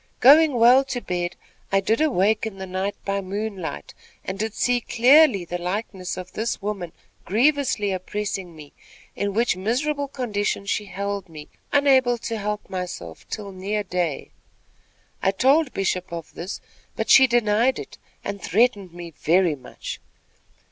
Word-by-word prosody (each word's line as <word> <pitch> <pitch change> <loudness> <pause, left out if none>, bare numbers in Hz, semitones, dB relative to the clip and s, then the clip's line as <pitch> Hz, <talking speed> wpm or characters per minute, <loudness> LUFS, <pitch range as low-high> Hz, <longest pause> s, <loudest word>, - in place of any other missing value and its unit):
Going 295 +2 +7
well 245 +3 +6
to 265 -2 -3
bed, 175 -4 -3 0.4
I 195 - +4
did 220 +7 0
awake 220 -7 +2
in 200 -3 -8
the 190 - -6
night 190 +2 -3
by 200 0 -1
moonlight, 195 - -5 0.3
and 190 +1 -4
did 220 0 -2
see 245 -1 +1
clearly 245 - +5
the 175 +1 -4
likeness 185 0 -4
of 180 -1 -7
this 225 +2 -2
woman 195 -4 -4 0.3
grievously 235 - +2
oppressing 190 -1 -4
me; 150 -2 -13 0.4
in 200 -1 -2
which 230 -3 +2
miserable 280 +9 -1
condition 210 -7 -2
she 210 +1 -1
held 200 0 -4
me, 155 -2 -11 0.2
unable 265 -4 +4
to 225 -1 -4
help 210 0 -3
myself 175 - -6
till 205 -2 -5
near 200 +3 -3
day. 175 -6 -2 0.9
I - - +3
told 270 +8 +3
Bishop 185 -2 -2
of 170 -2 -7
this; 180 +4 -6 0.3
but - - -1
she 265 0 +8
denied 235 +1 +2
it, - - -9 0.2
and 200 -1 -5
threatened 200 -4 +1
me 175 -1 -8
very 170 +2 +2
much. 130 -4 -8
200 Hz, 150 wpm, -23 LUFS, 185-240 Hz, 0.9 s, she